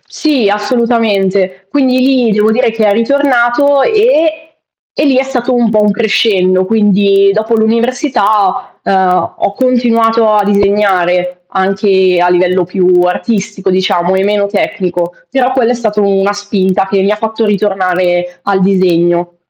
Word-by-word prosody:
Sì, 275 Hz, -10 st, -1 dB
assolutamente. 205 Hz, -4 st, -1 dB
Quindi 260 Hz, -1 st, +1 dB
lì 255 Hz, -3 st, +1 dB
devo 210 Hz, +1 st, +1 dB
dire 230 Hz, +1 st, +1 dB
che 220 Hz, -1 st, 0 dB
è 200 Hz, -, +2 dB
ritornato 275 Hz, +3 st, +1 dB
e 325 Hz, -9 st, +1 dB, 0.5 s
e 295 Hz, -, -1 dB
lì 275 Hz, -3 st, +2 dB
è 260 Hz, -, +2 dB
stato 260 Hz, -2 st, -3 dB
un 240 Hz, -2 st, +1 dB
po' 215 Hz, 0 st, +1 dB
un 210 Hz, -, +2 dB
crescendo, 200 Hz, -4 st, +1 dB
quindi 200 Hz, -1 st, +2 dB
dopo 220 Hz, +2 st, -1 dB
l'università, 225 Hz, -3 st, -1 dB
uhm, 190 Hz, -1 st, 0 dB
ho 200 Hz, -, -2 dB
continuato 230 Hz, -2 st, +1 dB
a 210 Hz, -1 st, +2 dB
disegnare 185 Hz, -3 st, 0 dB
anche 190 Hz, -1 st, +1 dB
a 180 Hz, -, +2 dB
livello 180 Hz, 0 st, +1 dB
più 180 Hz, +1 st, -1 dB, 0.2 s
artistico 195 Hz, +1 st, -2 dB
diciamo 185 Hz, -1 st, 0 dB
e 190 Hz, -, 0 dB
meno 205 Hz, 0 st, 0 dB
tecnico, 180 Hz, -3 st, -3 dB, 0.2 s
però 260 Hz, -1 st, 0 dB
quello 245 Hz, -2 st, +1 dB
è -, -, +1 dB
stato 215 Hz, -3 st, -2 dB
una 200 Hz, 0 st, 0 dB
spinta 195 Hz, -2 st, -1 dB
che 195 Hz, 0 st, 0 dB
mi 195 Hz, -, 0 dB
fatto 220 Hz, +1 st, -3 dB
ritornare 185 Hz, -3 st, -1 dB
al 200 Hz, -1 st, 0 dB
disegno. 175 Hz, -2 st, 0 dB
205 Hz, 145 wpm, -11 LUFS, 190-235 Hz, 0.5 s, è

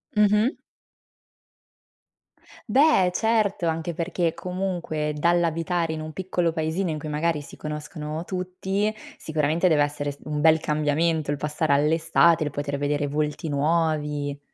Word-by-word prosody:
Mh-mh. 210 Hz, +4 st, +4 dB, 2.2 s
Beh, 260 Hz, -7 st, +5 dB
certo, 215 Hz, -4 st, +1 dB
anche 165 Hz, +1 st, -2 dB
perché 170 Hz, 0 st, -1 dB
comunque 180 Hz, -5 st, -3 dB
dall'abitare 170 Hz, +1 st, +1 dB
in 160 Hz, -, -4 dB
un 155 Hz, 0 st, -6 dB
piccolo 180 Hz, -2 st, -1 dB
paesino 160 Hz, +3 st, -1 dB
in 155 Hz, -, -3 dB
cui 150 Hz, +1 st, -6 dB
magari 150 Hz, +1 st, 0 dB
si 145 Hz, -, -12 dB
conoscono 150 Hz, +1 st, -5 dB
tutti, 190 Hz, +3 st, -2 dB, 0.2 s
sicuramente 160 Hz, +3 st, 0 dB
deve 155 Hz, -4 st, +4 dB
essere 145 Hz, 0 st, -2 dB
s 140 Hz, -, -14 dB
un 150 Hz, -1 st, -3 dB
bel 160 Hz, +1 st, +5 dB
cambiamento 155 Hz, +1 st, 0 dB
il 145 Hz, -, +1 dB
passare 150 Hz, +1 st, 0 dB
all'estate, 160 Hz, +2 st, +3 dB
il 145 Hz, -, -3 dB
poter 145 Hz, 0 st, -3 dB
vedere 145 Hz, +1 st, 0 dB
volti 150 Hz, +2 st, -2 dB
nuovi. 150 Hz, -1 st, 0 dB
160 Hz, 130 wpm, -25 LUFS, 150-175 Hz, 2.2 s, Beh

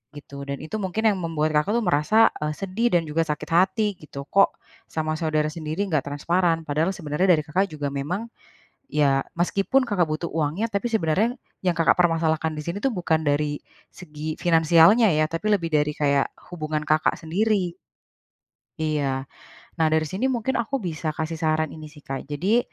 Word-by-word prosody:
gitu. 140 Hz, -1 st, -9 dB
Dan, 140 Hz, +1 st, -5 dB
itu 215 Hz, +8 st, -4 dB
mungkin 190 Hz, +4 st, -2 dB
yang 190 Hz, -, -5 dB
membuat 160 Hz, -3 st, -1 dB
Kakak 205 Hz, +8 st, -2 dB
tuh, 235 Hz, -, 0 dB
merasa, 185 Hz, +6 st, +4 dB
eee, 150 Hz, 0 st, -2 dB
sedih 195 Hz, +6 st, -1 dB
dan 170 Hz, -, +3 dB
juga 160 Hz, +1 st, -1 dB
sakit 150 Hz, +2 st, -4 dB
hati, 190 Hz, +5 st, +3 dB
gitu, 140 Hz, -2 st, -8 dB
"Kok, 195 Hz, +7 st, +3 dB, 0.3 s
sama 155 Hz, 0 st, -2 dB
saudara 155 Hz, -2 st, 0 dB
sendiri, 155 Hz, +4 st, -3 dB
nggak 155 Hz, -8 st, -1 dB
transparan?" 165 Hz, +3 st, +1 dB
padahal 160 Hz, +5 st, 0 dB
sebenarnya 155 Hz, +2 st, -1 dB
dari 155 Hz, -, -2 dB
Kakak 185 Hz, +7 st, 0 dB
juga 145 Hz, -5 st, -4 dB
memang, 180 Hz, +12 st, -4 dB, 0.6 s
ya, 140 Hz, -2 st, +2 dB, 0.2 s
meskipun 195 Hz, +9 st, +2 dB
Kakak 195 Hz, -8 st, 0 dB
butuh 155 Hz, +2 st, -3 dB
uangnya, 165 Hz, +9 st, -1 dB
tapi 200 Hz, +4 st, -1 dB
sebenarnya 220 Hz, +3 st, +1 dB, 0.2 s
yang 180 Hz, -2 st, 0 dB
Kakak 165 Hz, -, +4 dB
permasalahan 160 Hz, -2 st, +1 dB
di 150 Hz, -, -4 dB
sini 170 Hz, +5 st, -4 dB
tuh, 270 Hz, -, +2 dB
bukan 165 Hz, -3 st, +1 dB
dari 145 Hz, -1 st, 0 dB, 0.3 s
segi 155 Hz, -2 st, -6 dB
finansialnya 170 Hz, +5 st, +5 dB
ya, 155 Hz, 0 st, +2 dB
tapi 165 Hz, +7 st, -1 dB
lebih 175 Hz, -5 st, +1 dB
dari, 150 Hz, 0 st, +1 dB
kayak, 140 Hz, -2 st, +1 dB, 0.2 s
hubungan 155 Hz, -3 st, -3 dB
Kakak 155 Hz, 0 st, +2 dB
sendiri. 180 Hz, +1 st, 0 dB, 1.1 s
Iya, 140 Hz, -4 st, -1 dB, 0.5 s
nah 160 Hz, -, +4 dB
dari 160 Hz, 0 st, +3 dB
sini 190 Hz, -, -1 dB
mungkin 255 Hz, -1 st, -1 dB
aku 235 Hz, +4 st, -2 dB
bisa 160 Hz, -3 st, -3 dB
kasih 160 Hz, 0 st, -3 dB
saran 155 Hz, -1 st, 0 dB
ini 155 Hz, -1 st, -9 dB
sih, 150 Hz, -1 st, -16 dB
Kak. 135 Hz, 0 st, -6 dB
Jadi, 185 Hz, +11 st, +1 dB
160 Hz, 175 wpm, -24 LUFS, 150-190 Hz, 1.1 s, finansialnya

